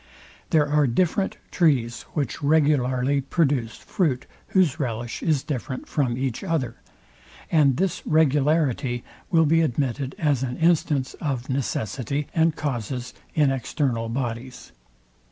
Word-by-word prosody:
There 155 Hz, -3 st, +3 dB
are 150 Hz, -1 st, +3 dB
different 180 Hz, -, +1 dB
trees, 130 Hz, -9 st, +1 dB
which 145 Hz, -6 st, -2 dB
regularly 140 Hz, -3 st, +2 dB
produce 135 Hz, -5 st, 0 dB
fruit, 160 Hz, -, -1 dB, 0.2 s
whose 170 Hz, -5 st, +2 dB
relish 120 Hz, -3 st, -3 dB
is 150 Hz, -5 st, +1 dB
different 130 Hz, -3 st, -4 dB
from 125 Hz, -5 st, 0 dB
each 130 Hz, -3 st, -2 dB
other; 150 Hz, -10 st, -1 dB, 0.7 s
and 145 Hz, -5 st, +4 dB
this 190 Hz, 0 st, 0 dB
regularity 145 Hz, -4 st, +2 dB, 0.3 s
will 165 Hz, -2 st, +4 dB
be 165 Hz, +2 st, +4 dB
admitted 135 Hz, -2 st, -1 dB
as 145 Hz, -5 st, +1 dB
an 125 Hz, -1 st, -3 dB
instance 155 Hz, -5 st, +2 dB
of 135 Hz, -5 st, -2 dB
necessity 130 Hz, +2 st, -2 dB
and 160 Hz, -1 st, +3 dB
causes 125 Hz, -3 st, -3 dB, 0.2 s
in 145 Hz, -3 st, +4 dB
external 125 Hz, -3 st, -1 dB
bodies. 120 Hz, 0 st, -4 dB
140 Hz, 120 wpm, -24 LUFS, 125-155 Hz, 0.7 s, and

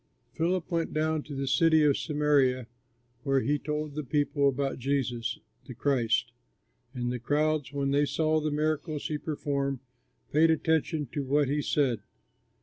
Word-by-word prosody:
Philip 175 Hz, +1 st, -1 dB
went 165 Hz, -1 st, -1 dB
down 155 Hz, 0 st, +1 dB
to 145 Hz, -1 st, -8 dB
the 135 Hz, 0 st, -2 dB
city 160 Hz, +3 st, +4 dB
of 145 Hz, -2 st, +4 dB
Samaria, 145 Hz, -5 st, +2 dB, 0.6 s
where 135 Hz, -1 st, +1 dB
he 145 Hz, +2 st, 0 dB
told 150 Hz, 0 st, -3 dB
the 150 Hz, +1 st, -4 dB
people 145 Hz, +1 st, +1 dB
about 135 Hz, 0 st, -2 dB
Jesus, 125 Hz, -3 st, -1 dB, 0.3 s
the 125 Hz, -, -8 dB
Christ. 125 Hz, -3 st, +1 dB, 0.6 s
And 120 Hz, -1 st, -2 dB
the 125 Hz, -, -3 dB
crowds, 150 Hz, +2 st, 0 dB
when 140 Hz, -1 st, -1 dB
they 145 Hz, +1 st, +3 dB
saw 155 Hz, +1 st, +1 dB
the 155 Hz, 0 st, -1 dB
miracles 155 Hz, 0 st, -1 dB
he 150 Hz, -1 st, -2 dB
performed, 140 Hz, -3 st, -2 dB, 0.6 s
paid 160 Hz, +2 st, +5 dB
attention 160 Hz, -1 st, +1 dB
to 145 Hz, -, -2 dB
what 140 Hz, +1 st, +2 dB
he 145 Hz, +1 st, +1 dB
said. 135 Hz, -6 st, +1 dB
145 Hz, 155 wpm, -28 LUFS, 135-155 Hz, 0.6 s, paid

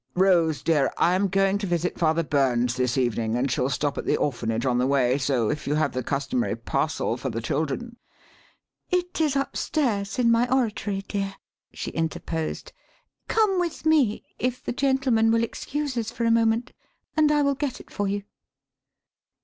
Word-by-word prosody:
Rose, 175 Hz, -5 st, +3 dB
dear, 150 Hz, -5 st, +2 dB
I 175 Hz, -, +3 dB
am 195 Hz, +2 st, +2 dB
going 195 Hz, +1 st, +2 dB
to 200 Hz, -, -3 dB
visit 175 Hz, 0 st, -1 dB
Father 165 Hz, 0 st, +2 dB
Burns 125 Hz, -5 st, +1 dB
this 125 Hz, 0 st, 0 dB
evening 115 Hz, -3 st, 0 dB
and 125 Hz, +2 st, 0 dB
shall 125 Hz, +1 st, +1 dB
stop 140 Hz, +2 st, -1 dB
at -, -, -5 dB
the -, -, +2 dB
orphanage 115 Hz, -4 st, -1 dB
on 125 Hz, -2 st, +2 dB
the 125 Hz, -, +2 dB
way, 135 Hz, -1 st, +2 dB
so 130 Hz, -5 st, +1 dB
if 150 Hz, 0 st, -5 dB
you 145 Hz, -, +1 dB
have 155 Hz, -, +1 dB
the 130 Hz, -, -1 dB
customary 135 Hz, -4 st, -1 dB
parcel 115 Hz, +1 st, -1 dB
for 130 Hz, +1 st, -3 dB
the 115 Hz, -1 st, -3 dB
children 155 Hz, -, -3 dB, 0.5 s
" -, -, -38 dB
"It 355 Hz, -2 st, -5 dB
is 300 Hz, -3 st, +2 dB
upstairs, 250 Hz, -7 st, -1 dB
in 235 Hz, -2 st, +3 dB
my 235 Hz, +2 st, +2 dB
oratory, 210 Hz, -6 st, 0 dB
dear," 195 Hz, -1 st, -3 dB, 0.4 s
she -, -, -5 dB
interposed. 160 Hz, 0 st, -3 dB, 0.5 s
"Come 420 Hz, -4 st, +2 dB
with 345 Hz, -2 st, -3 dB
me 290 Hz, -9 st, +3 dB, 0.2 s
if 250 Hz, 0 st, -2 dB
the -, -, -3 dB
gentlemen 265 Hz, -4 st, +2 dB
will 230 Hz, 0 st, +3 dB
excuse 285 Hz, +4 st, -3 dB
us 225 Hz, -2 st, -2 dB
for 235 Hz, 0 st, -3 dB
a 230 Hz, -, +3 dB
moment 230 Hz, +1 st, +2 dB, 0.4 s
and 305 Hz, -1 st, +4 dB
I 295 Hz, -1 st, +3 dB
will 280 Hz, 0 st, +2 dB
get 275 Hz, -1 st, -3 dB
it -, -, -15 dB
for 205 Hz, -1 st, -1 dB
you." 200 Hz, +1 st, -2 dB
195 Hz, 180 wpm, -25 LUFS, -, 0.5 s, and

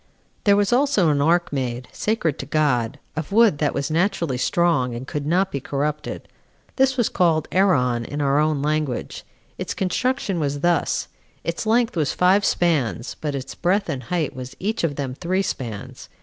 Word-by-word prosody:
5. -, -, -38 dB, 0.4 s
There 200 Hz, -1 st, +6 dB
was 205 Hz, +2 st, +2 dB
also 245 Hz, -, +3 dB
an 145 Hz, -1 st, +2 dB
ark 170 Hz, +2 st, +2 dB
made, 125 Hz, -2 st, -3 dB
sacred 210 Hz, -9 st, -1 dB
to 135 Hz, -, -5 dB
God, 140 Hz, -5 st, +1 dB, 0.2 s
of 160 Hz, +3 st, -4 dB
wood 215 Hz, -8 st, +4 dB
that 150 Hz, -, 0 dB
was 140 Hz, +2 st, -2 dB
naturally 170 Hz, -4 st, +1 dB
strong, 150 Hz, -7 st, +1 dB
and 120 Hz, +2 st, -6 dB
could 145 Hz, +1 st, -4 dB
not 185 Hz, +4 st, +2 dB
be 140 Hz, -, -2 dB
corrupted. 145 Hz, +2 st, -3 dB, 0.5 s
This 265 Hz, 0 st, +3 dB
was 240 Hz, -, +3 dB
called 165 Hz, -5 st, +1 dB
Eron 125 Hz, -12 st, +2 dB
in 145 Hz, -, -5 dB
our 140 Hz, 0 st, +2 dB
own 150 Hz, -2 st, +1 dB
language. 150 Hz, -4 st, -2 dB, 0.4 s
Its -, -, -3 dB
construction 200 Hz, 0 st, -1 dB
was 145 Hz, -2 st, -2 dB
thus: 175 Hz, -2 st, +1 dB, 0.4 s
its 170 Hz, +6 st, -3 dB
length 230 Hz, 0 st, +2 dB
was 155 Hz, -4 st, 0 dB
five 190 Hz, +3 st, +4 dB
spans, 140 Hz, -, 0 dB
but 150 Hz, -2 st, -2 dB
its 135 Hz, -1 st, -5 dB
breadth 190 Hz, +2 st, 0 dB
and 135 Hz, -4 st, -2 dB
height 170 Hz, -6 st, -1 dB
was 130 Hz, 0 st, -7 dB
each 215 Hz, +2 st, -2 dB
of 155 Hz, -4 st, 0 dB
them 135 Hz, -3 st, -3 dB
three 185 Hz, +7 st, -1 dB
spans. 115 Hz, -, -6 dB
155 Hz, 180 wpm, -22 LUFS, 140-190 Hz, 0.5 s, There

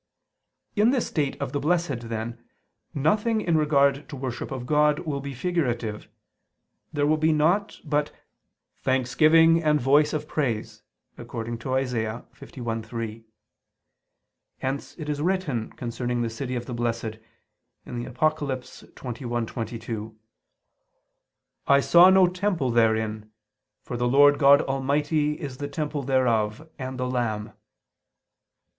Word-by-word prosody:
In 210 Hz, +2 st, +4 dB
this 255 Hz, -2 st, +1 dB
state 145 Hz, -4 st, -2 dB
of 140 Hz, -2 st, -3 dB
the 145 Hz, -, -1 dB
Blessed, 145 Hz, -7 st, -1 dB
then, 115 Hz, +1 st, -5 dB, 0.5 s
nothing 210 Hz, -, +1 dB
in 170 Hz, -6 st, +1 dB
regard 140 Hz, -2 st, +2 dB
to 150 Hz, -, -6 dB
worship 130 Hz, -2 st, -5 dB
of 130 Hz, -2 st, -5 dB
God 150 Hz, +1 st, +3 dB
will 145 Hz, -3 st, -3 dB
be 140 Hz, -1 st, -6 dB
figurative; 125 Hz, -9 st, -2 dB, 0.8 s
there 145 Hz, -1 st, 0 dB
will 155 Hz, +1 st, +3 dB
be 160 Hz, +1 st, +3 dB
naught 175 Hz, +7 st, +1 dB
but 150 Hz, 0 st, 0 dB, 0.7 s
"thanksgiving 155 Hz, +6 st, +4 dB
and 150 Hz, -1 st, +3 dB
voice 145 Hz, +4 st, +4 dB
of 150 Hz, 0 st, -3 dB
praise" 125 Hz, -9 st, -2 dB, 0.4 s
(Isa. -, -, -7 dB
51:3). 115 Hz, -1 st, -4 dB, 1.3 s
Hence 135 Hz, +2 st, -4 dB
it 155 Hz, -3 st, -6 dB
is 145 Hz, -1 st, -2 dB
written 155 Hz, -10 st, -1 dB
concerning 120 Hz, 0 st, -3 dB
the 115 Hz, -, -2 dB
city 125 Hz, +2 st, -4 dB
of 120 Hz, 0 st, -3 dB
the 125 Hz, -, -6 dB
Blessed 115 Hz, -2 st, -2 dB, 0.7 s
(Apoc. 125 Hz, +6 st, -1 dB
21:22): 120 Hz, -4 st, -5 dB, 1.5 s
"I 140 Hz, 0 st, +6 dB
saw 175 Hz, +5 st, +7 dB
no 190 Hz, 0 st, +6 dB
temple 180 Hz, -7 st, 0 dB
therein: 110 Hz, -2 st, +1 dB, 0.5 s
for 125 Hz, -, -6 dB
the 120 Hz, 0 st, 0 dB
Lord 145 Hz, +3 st, +5 dB
God 140 Hz, 0 st, +6 dB
Almighty 145 Hz, +3 st, 0 dB
is 135 Hz, -3 st, -6 dB
the 145 Hz, -, -4 dB
temple 150 Hz, 0 st, -3 dB
thereof, 125 Hz, -1 st, +1 dB
and 130 Hz, 0 st, -5 dB
the 125 Hz, -, -1 dB
Lamb." 110 Hz, -4 st, -2 dB
135 Hz, 120 wpm, -25 LUFS, 120-150 Hz, 1.5 s, saw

